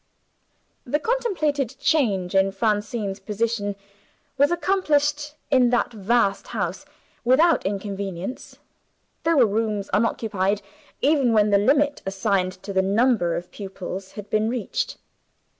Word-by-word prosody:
The 270 +4 0
contemplated 305 - -1
change 205 - +1
in 195 0 +3
Francine's 205 -1 -1
position 210 -1 -2 0.6
was 285 +1 +4
accomplished, 300 -5 +1 0.2
in 255 -3 +5
that 245 0 +1
vast 210 -1 +1
house, - - -3 0.4
without 305 +8 +4
inconvenience. 195 +1 -5 0.6
There 330 -1 +2
were 255 - +7
rooms 210 -1 -1
unoccupied, 205 -2 0 0.4
even 275 -5 +3
when 210 -1 +4
the 200 - +5
limit 285 +6 +2
assigned 195 -1 0
to 200 - -5
the 190 - +3
number 200 -3 +2
of 175 +1 -6
pupils 190 -1 -7
had 210 -1 -8
been 215 +1 +2
reached. 240 -3 -3
220 Hz, 120 wpm, -23 LUFS, 195-275 Hz, 0.6 s, were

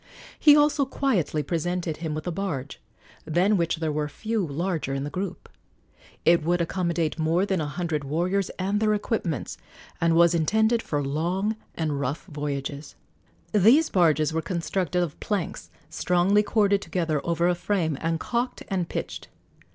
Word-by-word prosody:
He 295 -2 +8
also 295 -1 +3
quietly 205 - 0
presented 175 -1 -2
him 160 -2 -3
with 155 - -5
a 175 - -2
barge, 160 -7 -4 0.4
than 180 +7 +2
which 170 -3 +1
there 160 -1 -2
were 150 0 -2
few 220 +6 -2
larger 160 -2 -2
in 135 - -2
the 145 - -5
group. 190 0 -5 0.8
It 170 -1 +5
would 175 +2 +1
accommodate 170 -2 -1
more 165 +4 +2
than 190 -4 0
a 150 - -2
hundred 160 -1 -2
warriors 175 +7 0
and 195 +2 0
their 215 -1 +2
equipments, 205 - -2 0.4
and 165 0 +3
was 170 0 +5
intended 220 +8 +2
for 145 -7 -2
long 175 +9 -1 0.2
and 155 -3 -1
rough 140 +3 -3
voyages. 145 -2 -5 0.6
These 230 - +5
barges 160 -4 +3
were 160 - 0
constructed 180 0 -1
of 160 -4 -5
planks 200 -6 -3 0.2
strongly 180 +5 +2
corded 205 -2 +2
together 160 -3 -1
over 170 0 +1
a 180 - +3
frame, 175 -3 -1
and 165 0 0
calked 245 +5 -2
and 185 -4 -1
pitched. - - -5
170 Hz, 160 wpm, -25 LUFS, 155-195 Hz, 0.8 s, He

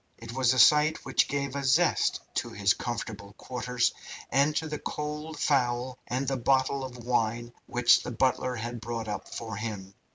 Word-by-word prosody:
It 115 0 -9
was 130 -1 +3
a 130 - 0
sight 150 +6 +5
which - - +2
gave 140 -1 -2
a 140 - -2
zest 150 +6 +2
to - - -2
his 100 0 +2
comfortable 110 -4 -5
quarters, 125 +1 -1 0.4
and 140 +4 +3
to 160 - -1
the 150 -1 -4
cold 150 +1 -5
fowl 125 -2 0
and 130 +3 -2
the 135 0 0
bottle 135 +2 +1
of 130 -1 -7
wine 120 -1 0
which 125 0 +4
the - - -6
butler 130 +1 0
had 120 0 -5
brought 115 0 -4
up 105 - -5
for 110 -3 -5
him. 100 -3 -5
125 Hz, 175 wpm, -28 LUFS, 115-140 Hz, 0.4 s, sight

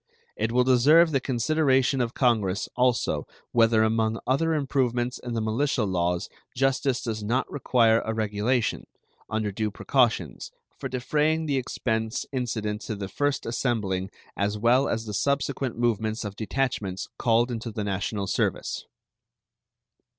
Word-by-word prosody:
It 110 +1 -1
will 125 +1 +4
deserve 145 +7 +5
the 135 - +2
consideration 135 0 +2
of 120 -1 -2
Congress 110 -6 +1
also 125 -2 +1 0.2
whether 115 -1 +4
among 110 0 +1
other 160 +5 +1
improvements 125 -4 0
in 120 -1 -5
the 115 - 0
militia 115 +3 0
laws 90 -3 0 0.3
justice 135 0 +1
does 110 -2 -3
not 120 +5 0
require 115 -5 +3
a 110 - -2
regulation, 110 +2 -1 0.4
under 110 -1 -1
due 105 +2 -1
precautions, 120 +2 0 0.3
for - - -4
defraying 150 +5 0
the 140 -3 0
expense 110 -3 -2
incident 110 -5 -2
to 110 - -4
the 100 -1 -5
first 145 +4 -1
assembling 105 -6 -1 0.3
as 100 +1 -1
well 120 +5 +3
as 115 0 -2
the 105 - -5
subsequent 140 0 -1
movements 110 -1 0
of 100 -1 -5
detachments 110 -4 -2
called 120 +1 +2
into 115 0 -4
the 110 -1 -4
national 100 +1 -2
service. - - -1
115 Hz, 140 wpm, -26 LUFS, 110-130 Hz, 0.4 s, deserve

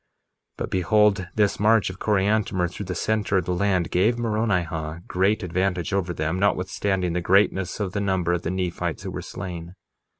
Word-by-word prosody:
1:25 - - -47
But - - -3
behold, 100 +1 +3
this 105 -2 +2
march 110 -2 +3
of 95 - -12
Coriantumr 100 -3 +1
through 100 0 -7
the 90 - -3
center 105 +1 0
of 90 - 0
the 90 - -1
land 90 -2 +1
gave 105 +7 +2
Moronihah 90 -8 -1
great 100 +4 +1
advantage 90 0 -1
over 95 -3 0
them, 80 +2 -2
notwithstanding 95 -2 0
the 90 - -1
greatness 95 +1 +2
of 100 -3 -2
the 100 - -2
number 95 -3 +1
of 90 - -1
the 80 - -3
Nephites 90 -1 -2
who - - -5
were - - -5
slain. 85 -1 -7
95 Hz, 180 wpm, -24 LUFS, 90-100 Hz, -, behold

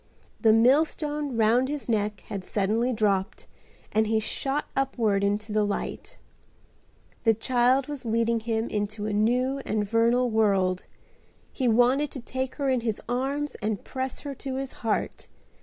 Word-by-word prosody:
The 225 - +5
millstone 290 +3 +2
round 235 +4 +3
his 295 -1 -4
neck 210 -3 -1
had 195 -2 -6
suddenly 220 +6 0
dropped 205 -4 0 0.5
and 220 0 +2
he 220 0 +2
shot 270 +6 -2
upward 230 -7 +1
into 205 +2 -1
the 215 0 +3
light. 205 -1 -4 1.1
The 225 -2 +4
child 250 +3 +2
was 290 -2 -6
leading 230 0 +1
him 225 0 -1
into 210 0 -3
a 215 - -2
new 250 +6 +1
and 215 -5 -2
vernal 235 +3 +2
world. 195 -4 +2 0.7
He 260 - 0
wanted 245 +5 +3
to 270 - -5
take 260 +2 -4
her 280 -2 -2
in 260 -2 +2
his 225 -3 -2
arms 275 +4 -1
and 210 -1 -2
press 260 0 -4
her 285 -1 -5
to 270 0 -5
his 270 0 -4
heart. 225 -2 -2
230 Hz, 155 wpm, -26 LUFS, 215-260 Hz, 1.1 s, The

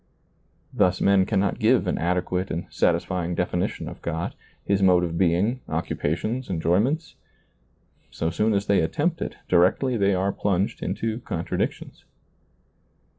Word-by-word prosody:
Thus 90 0 +2
men 100 -1 +3
cannot 100 -2 0
give - - +3
an - - -1
adequate 90 +1 -1
and 85 - -3
satisfying 90 -1 0
definition 90 0 -2
of - - -9
God, 85 0 -3 0.3
His 100 -1 +1
mode 90 -2 +5
of 85 -1 -2
being, 95 +8 +1
occupations, 85 - -2
enjoy 85 0 +2
ments; 155 +9 -1 1.0
so 80 - -2
soon 105 +5 +1
as 100 0 0
they 100 - +3
attempt 80 - -1
it, - - -4
directly 95 +8 +3
they 100 -2 +2
are 95 +2 +1
plunged 100 -1 -1
into 115 0 -2
contradictions. 85 -8 -4
90 Hz, 135 wpm, -24 LUFS, 85-100 Hz, 1.0 s, mode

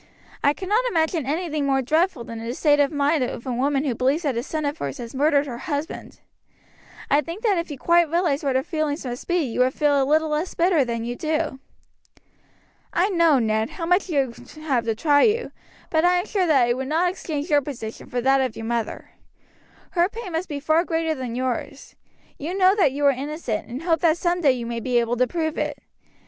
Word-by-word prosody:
I 285 - +4
cannot 415 +6 0
imagine 320 - 0
anything 305 -1 -1
more 270 -1 +2
dreadful 315 -1 +1
than 230 0 -7
the 235 +2 -4
state 290 -1 +3
of 285 +1 +3
mind 290 0 +1
of 240 - -5
a 255 - -2
woman 275 +3 +1
who 265 - 0
believes 265 +8 0
that 280 -5 0
a 235 - 0
son 305 +3 -3
of 290 +2 -2
hers - - -4
has 235 -3 -8
murdered 285 +1 +2
her 240 -4 -6
husband. 300 -1 -5 0.9
I 290 +2 +5
think 335 - -8
that 405 -6 +2
if 335 - -4
you 290 - -6
quite 340 +3 +3
realized 335 -4 +1
what 275 -2 0
her 260 - +2
feelings 310 -2 -2
must 245 0 -6
be 350 - +1
you 250 -4 -4
would 255 +1 +3
feel 290 -2 +3
a - - +3
little 310 +3 +2
less 305 +4 -2
bitter 340 -4 +3
than 230 -2 -3
you 240 +1 -3
do. 310 -1 -2 1.3
"I 365 +4 +2
know, 335 -6 +4
Ned, 220 -2 0
how 335 - -5
much 360 +3 +2
you 275 -6 0 0.2
have 290 -6 -1
to 225 -1 0
try 285 +4 +3
you, 460 +2 +2 0.4
but 315 0 +2
I 355 +1 +4
am 355 - -1
sure 380 -4 0
that 270 -6 +4
I 240 - +2
would 260 +1 -4
not 335 +5 +2
exchange 315 -3 -5
your 290 -1 +5
position 240 -6 -7
for 245 - -2
that 270 +2 +3
of 255 -4 -2
your 225 - -6
mother. 230 -1 -3 0.8
Her 350 +1 +2
pain 440 -3 -7
must 330 +3 -3
be 290 -2 -3
far 315 +3 +2
greater 325 -2 -1
than 255 -5 -5
yours. 255 -1 -4 0.4
You 340 +7 -4
know 375 0 +5
that 370 -10 +3
you 285 +2 -1
are 280 - +7
innocent, 275 -4 -4
and 255 +6 -6
hope 330 -2 +2
that 325 0 +3
some 350 0 0
day 280 -5 +5
you 240 -2 -5
may 235 0 -3
be 245 +1 0
able 235 +1 -1
to 255 +1 +3
prove 320 -1 -2
it. - - -2
290 Hz, 225 wpm, -23 LUFS, 255-335 Hz, 1.3 s, are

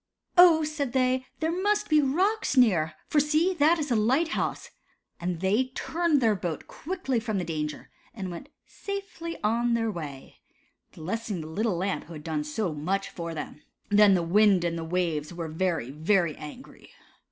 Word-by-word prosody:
"Oh," 345 -3 +7
said 295 -4 -3
they, 255 0 +1
"there 320 +1 +1
must 415 +4 0
be 305 -1 +4
rocks 360 +4 +1
near, 170 -11 +4
for 300 - +3
see, 310 +5 +2
that 315 +4 +5
is 295 -4 -3
a - - +3
light 260 +10 +2
house," - - -3 0.5
and 175 -1 -3
they 205 +7 +2
turned 330 -4 +1
the 225 -3 +4
boat 175 -4 -4
quickly 320 -8 -3
from 220 -2 -2
the 185 - -1
danger, 150 -3 -4 0.2
and 195 -6 -6
went 175 +11 -8 0.2
safely 395 -4 -6
on 235 +2 +2
their 225 -1 0
way, 145 -7 -8 0.5
blessing 200 +2 -4
the - - -7
little 195 +3 -1
Lamp 190 +2 -2
who 170 - -11
had 150 -1 -9
done 155 -2 -2
so 160 +4 -2
much 190 +7 -2
for 170 -1 -6
them. 150 0 -7 0.3
Then 205 -1 +6
the 175 - +1
wind 195 +1 +4
and 170 -1 -1
the 165 - -4
waves 165 -2 -2
were 170 -1 -4
very, 160 -5 -1
very 165 +2 +1
angry. 155 - -11
210 Hz, 175 wpm, -27 LUFS, -, 0.5 s, Oh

